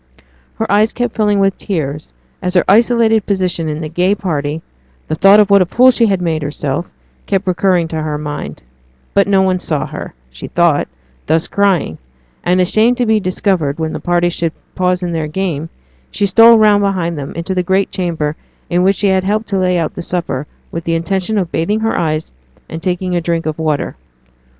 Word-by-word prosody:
Her 225 - -2
eyes 210 +2 +3
kept 245 -2 -2
filling 210 -2 +2
with 195 -1 +1
tears 150 -6 -4 0.3
as 180 0 -2
her 180 - +5
isolated 225 0 +3
position 180 -5 -1
in 150 +1 -4
the 155 - -4
gay 180 +5 +1
party, 155 -5 -3 0.4
the - - -2
thought 195 +6 +6
of 205 -1 +3
what 200 -1 +6
a - - +4
fool 255 +7 +5
she 235 -2 +2
had 190 -3 0
made 160 -2 -1
of 145 - -3
herself, 145 +2 -3 0.4
kept 195 -1 0
recurring 185 -2 +1
to 160 -1 -3
her 155 -1 -3
mind; 145 - -6 0.5
but 200 0 +3
no 195 -1 +3
one 185 -1 +1
saw 155 -5 -2
her, - - -8 0.2
she 65 - -8
thought, 170 -4 +2 0.4
thus 160 +1 +1
crying; 195 - 0 0.4
and, 180 +1 +2
ashamed 220 +7 +3
to 245 - +1
be 220 -1 +3
discovered 185 -6 -1
when 160 -1 -3
the - - -4
party 175 0 +1
should 165 -2 -2 0.2
pause 180 0 0
in 175 - -2
their 160 -2 -2
game, 165 -2 -3 0.4
she 205 - -1
stole 230 +4 +7
round 210 -2 +4
behind 185 -4 -1
them 140 -2 -6
into 170 +3 -3
the 185 - +1
great 190 +2 0
chamber 160 -5 -2 0.4
in 175 +1 +2
which 195 +2 +3
she 205 0 +1
had 190 -1 +2
helped 210 +3 0
to 195 -2 0
lay 180 -1 +1
out 165 -2 -1
the - - -6
supper, 170 -5 -3 0.2
with 165 - -5
the 165 0 -1
intention 190 +5 -1
of 180 -4 -1
bathing 205 +7 -1
her 225 0 0
eyes, 155 -2 -1 0.4
and 160 - -7
taking 180 0 -2
a 175 - 0
drink 165 0 -1
of 155 0 -3
water. 155 -2 -1
180 Hz, 205 wpm, -15 LUFS, 160-200 Hz, 0.5 s, stole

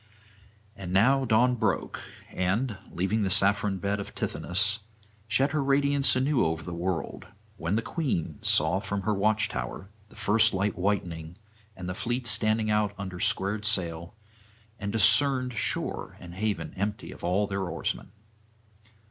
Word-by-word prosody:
And 95 -4 -7
now 130 +8 +4
Dawn 120 +2 +3
broke, 110 -3 -1 0.3
and, 105 +6 -1 0.2
leaving 95 +5 -1
the 100 - 0
saffron 100 +1 +3
bed 100 +2 -2
of 100 - -8
Tithonus, 100 +4 +1 0.5
shed 135 +6 +2
her 150 -2 0
radiance 140 0 +3
anew 130 +1 +2
over 80 0 -1
the 90 - -6
world; 85 0 -3 0.3
when 85 +2 -1
the 115 - 0
Queen 90 - -2
saw 80 +5 +3
from 100 0 -4
her 110 - +1
watch 105 +2 +2
tower 60 +11 -6 0.2
the - - -18
first 110 0 +3
light 100 +2 0
whitening, 90 -4 -2 0.4
and 90 - -6
the 90 - -3
fleet 120 +5 -3
standing 110 -1 +3
out 105 -1 +1
under 95 -2 -6
squared 100 +4 -1
sail, 85 -4 -1 0.6
and 100 -1 -3
discerned 125 +4 +3
shore - - -1
and 85 -1 -10
haven 105 +2 -3
empty 100 +2 -3
of - - -13
all 95 +4 +1
their 100 -2 -3
oarsmen. 85 - -3
100 Hz, 150 wpm, -27 LUFS, 90-115 Hz, 0.6 s, now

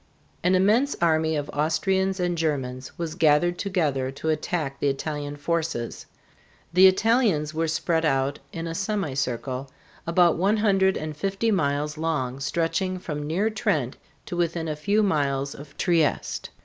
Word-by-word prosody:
An 180 +1 +4
immense 220 +10 +3
army 160 -1 +2
of 145 -1 -2
Austrians 190 +5 0
and 175 -1 0
Germans 135 -6 -3
was 165 -2 -3
gathered 165 +3 +3
together 155 -10 0
to 140 +4 -4
attack 155 -2 -2
the - - +1
Italian 145 +1 -4
forces. 160 -6 -2 0.7
The 185 +2 +8
Italians 190 - +2
were 165 +1 0
spread 165 +1 0
out 135 -2 +1
in 165 0 -5
a 165 - -4
semicircle 135 - -2 0.4
about 170 0 +4
one 200 +5 +2
hundred 195 -3 +3
and 155 0 -5
fifty 195 +7 -1
miles 150 -4 0
long 135 -6 -1
stretching 170 +6 -1
from 150 -4 -5
near 195 +8 0
Trent 145 - -1 0.3
to - - -5
within 170 -1 -1
a 155 - -2
few 200 +8 +1
miles 140 -6 0
of 140 0 -12
Trieste. 165 -4 0
160 Hz, 150 wpm, -25 LUFS, 145-185 Hz, 0.7 s, The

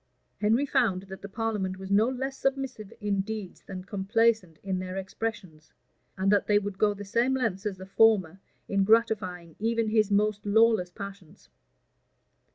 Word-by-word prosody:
Henry 225 +6 +2
found 230 -10 +1
that 190 0 -10
the 200 - -8
parliament 205 -4 -2
was 190 +1 -8
no 215 +4 +4
less 265 +1 -3
submissive 270 -7 -2
in 200 -2 0
deeds 210 -2 -6
than 185 -1 -8
complaisant 200 -2 +1
in 190 -2 -2
their 185 0 -5
expressions, 190 -5 -5 0.5
and 190 +1 +2
that 205 -1 +3
they 210 - +4
would 205 -2 -3
go 205 -1 +3
the 205 0 -8
same 235 +6 +1
lengths 215 -6 -1
as 195 -2 -4
the 190 - -9
former 195 -3 +3 0.3
in 195 0 +2
gratifying 195 -6 +1
even 230 0 0
his 215 -1 +3
most 210 0 +1
lawless 220 -3 +3
passions. 200 -3 -10
205 Hz, 165 wpm, -28 LUFS, 190-225 Hz, 0.5 s, no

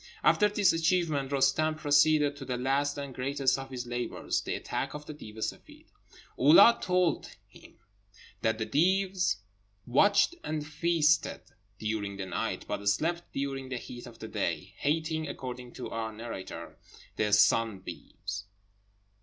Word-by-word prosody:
After 210 -1 +5
this 205 -3 +3
achievement 165 -4 +1
Roostem 140 +3 +2
proceeded 145 -1 +4
to 140 - -7
the 125 -2 -3
last 140 +3 0
and 140 -2 -5
greatest 135 +1 0
of 135 0 -7
his 125 -2 -5
labours, 120 -1 -2
the - - -3
attack - - -3
of 150 0 -7
the 155 - -7
Deev 110 -7 -11
e - - -7
Seffeed. - - -6 0.5
Oulâd 195 - +7
told 180 -3 +1 0.2
him - - -17 0.6
that 110 0 +1
the 110 - -2
Deevs 185 - +2 0.5
watched 200 - +4
and 155 -1 -3
feasted 155 0 +2 0.4
during 105 -2 -3
the 95 - -4
night, 95 - -3
but - - -3
slept 170 - -1
during 135 -1 -3
the 130 - -3
heat 120 +1 -9
of 115 -2 -12
the - - -7
day, - - -3
hating 155 +1 -1
(according 125 -3 -6
to 125 - -7
our 110 0 -3
narrator) 100 -7 -8 0.4
the 105 -1 +1
sunbeams. 100 -2 +1
140 Hz, 145 wpm, -29 LUFS, 120-155 Hz, 0.6 s, Oulâd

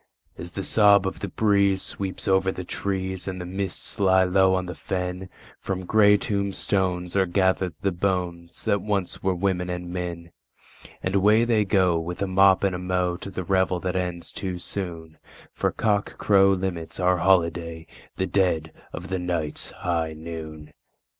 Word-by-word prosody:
As 85 0 -8
the 95 - -4
sob 100 -1 +6
of 95 - -3
the 100 - -4
breeze 100 -1 +2
sweeps 95 -1 -3
over 95 0 +3
the 90 - -6
trees, 95 0 -2
and 95 -1 -4
the 90 - -5
mists 95 +4 -2
lie 95 -1 +4
low 95 +1 +3
on 95 -1 -1
the 90 - -6
fen, 90 +2 -4 0.3
From 95 -1 -4
grey 105 0 +5
tombstones 95 -3 -1
are 95 -1 +3
gathered 95 -1 +1
the 100 - +2
bones 85 -2 -2
that 100 -1 +1
once 100 -3 -2
were 95 -1 0
women 90 -1 -1
and 90 0 -5
men, 85 -2 -5 0.7
And 95 - -1
away 105 +4 +4
they 110 -3 +2
go, 95 -4 +2
with 85 +2 -5
a - - -1
mop 95 +1 +4
and 95 -1 +1
a 90 - -4
mow, 90 -1 -1
to 100 - -8
the 95 -1 -5
revel 95 0 +1
that 90 0 -2
ends 90 -2 -3
too 95 -2 -4
soon, 85 -4 -2 0.3
For - - -1
cockcrow 100 -2 +2
limits 90 -3 -4
our 90 0 +3
holiday—the 85 -1 -1
dead 90 -4 0 0.2
of 90 0 -7
the 95 -1 -2
night's 85 -4 -2
high 85 -2 -2
noon! 80 -1 -9
95 Hz, 165 wpm, -24 LUFS, 90-95 Hz, 0.7 s, sob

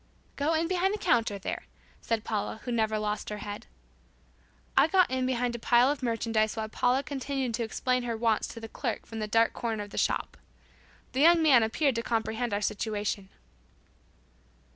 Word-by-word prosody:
"Go 300 +3 +1
in 325 +1 +1
behind 375 +3 +1
the - - -4
counter, 225 - +1
there," 195 - -5 0.3
said 225 -2 -1
Paula 215 0 -3
who 245 - -4
never 220 -2 +1
lost 210 0 -2
her 210 - -4
head. 205 0 -7 1.1
I 275 +3 +6
got 370 -2 +3
in 260 0 0
behind 245 -1 0
a - - -5
pile 240 +3 +4
of 290 - -4
merchandise 225 -2 0
while 220 -1 -3
Paula 250 +4 +1
continued 270 -3 -3
to 230 +1 -1
explain 250 +3 0
her 235 -2 -3
wants 225 -1 +1
to - - -8
the 225 - -7
clerk 235 +1 -4
from 225 - -7
the 215 - -2
dark 225 +2 +3
corner 225 -3 -3
of 205 - -12
the - - -3
shop. - - -1 0.7
The 270 - +1
youug 340 +1 +7
man 290 -7 +6
appeared 260 +6 +1
to 230 - -1
comprehend 230 0 -1
our 205 0 -1
situation. 205 -2 -2
230 Hz, 185 wpm, -29 LUFS, 220-260 Hz, 1.1 s, youug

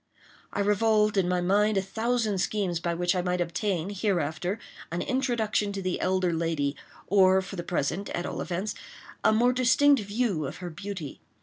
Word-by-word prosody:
I - - -1
revolved 210 +1 +3
in 190 -3 +2
my 180 0 +1
mind 205 +3 +2
a - - +3
thousand 220 0 -1
schemes 185 -3 0
by 170 -1 -2
which 175 +1 +1
I 180 - +1
might 180 0 -1
obtain, 175 +1 -1
hereafter, 180 -2 -1 0.3
an 170 +1 -2
introduction 235 -6 0
to 195 - -4
the 185 -1 -1
elder 185 -1 +1
lady, 160 -4 -1 0.3
or, 190 -1 +5
for 190 +1 -6
the 175 - -3
present, 175 +3 -2
at 175 - -3
all - - -4
events, 185 +5 -3 0.5
a - - +5
more 240 +3 +3
distinct 255 +2 +4
view 205 - -1
of - - -7
her 180 -1 -6
beauty. 175 -3 -7
190 Hz, 180 wpm, -27 LUFS, 175-215 Hz, 0.5 s, or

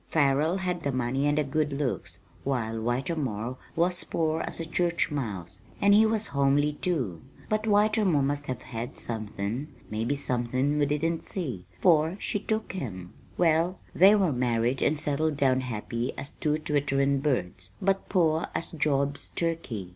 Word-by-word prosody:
Farrell 150 +3 +2
had 180 -2 -2
the 140 - -1
money 130 +2 0
and 145 0 +2
the 150 - +3
good 150 +1 0
looks, 140 -2 -3 0.3
while 120 -5 -1
Whitermore 125 -1 -2 0.2
was 175 +2 +2
poor 160 -1 0
as - - -3
a 165 - -2
church 170 0 0
mouse, 95 - -4 0.2
and 200 0 +5
he 220 +2 +6
was 220 0 +1
homely, 140 +2 +3
too. 140 - -2 0.3
But 215 +1 0
Whitermore 205 -7 +3
must 145 +1 -1
have 130 -2 -4
had 115 0 -6
somethin' 110 +3 -3 0.2
maybe 115 +6 0
somethin' 130 +2 0
we 145 - +3
didn't 160 +3 0
see, 125 - -5
for 160 +2 +4
she 205 - -1
took 220 +2 -2
him. 95 - -6 0.2
"Well, 170 +2 +3 0.2
they 195 +4 +7
married 125 - +1
and 150 0 +2
settled 150 0 0
down 130 -2 +3
happy 115 0 -3
as 140 +2 -5
two 150 0 0
twitterin' 140 -2 +1
birds, 95 -10 -1
but 195 0 0
poor 165 -4 +2
as 165 - -2
Job's 140 -2 0
turkey. 150 - -2
145 Hz, 155 wpm, -28 LUFS, 125-165 Hz, 0.3 s, they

